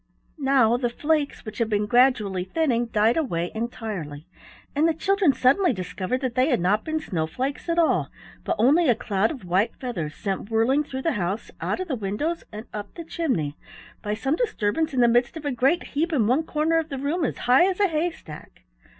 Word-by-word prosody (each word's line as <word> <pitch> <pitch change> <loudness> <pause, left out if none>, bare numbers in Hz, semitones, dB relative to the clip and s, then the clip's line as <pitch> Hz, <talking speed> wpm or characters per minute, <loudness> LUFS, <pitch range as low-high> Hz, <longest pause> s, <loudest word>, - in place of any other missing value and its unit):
Now 265 -4 +3
the 245 -1 0
flakes, 295 +3 -1
which 215 0 -7
had 230 -2 +1
been 210 -1 +1
gradually 220 -6 +3
thinning, 240 - 0
died 220 +3 +2
away 175 - -1
entirely, 210 -10 -5 0.5
and 305 +3 +3
the 325 - +1
children 390 -1 +3
suddenly 275 +6 +3
discovered 185 +5 -3
that 255 -3 -2
they 255 +4 +2
had 250 - +2
not 200 +5 +1
been 315 0 -2
snowflakes 255 - -3
at 335 - +1
all 335 -2 +2 0.3
but - - -1
only 285 +8 +4
a 240 - +5
cloud 205 0 0
of 260 -11 -7
white 185 +5 +1
feathers 175 - -5
sent 195 0 -4
whirling 235 +6 +2
through 265 -2 -6
the 330 - +2
house, 190 +6 -3
out - - -1
of 370 - -3
the 305 - -2
windows, 230 - -2
and 215 +1 -8
up 205 -1 -7
the 335 - -6
chimney 255 - -2 0.5
by 210 0 -2
some 270 +7 0
disturbance 320 - 0
in 260 -2 +1
the 240 - +6
midst 240 +5 +2
of 310 - -9
a 290 - 0
great 270 +8 +2
heap 325 +4 0
in 260 -9 +2
one 255 +8 +3
corner 315 +2 +1
of 320 0 -4
the 275 - -4
room 295 +6 -1
as 275 - -1
high 265 +10 +4
as 375 - -3
a 405 - +4
haystack. 315 - -5
250 Hz, 205 wpm, -24 LUFS, 210-310 Hz, 0.5 s, the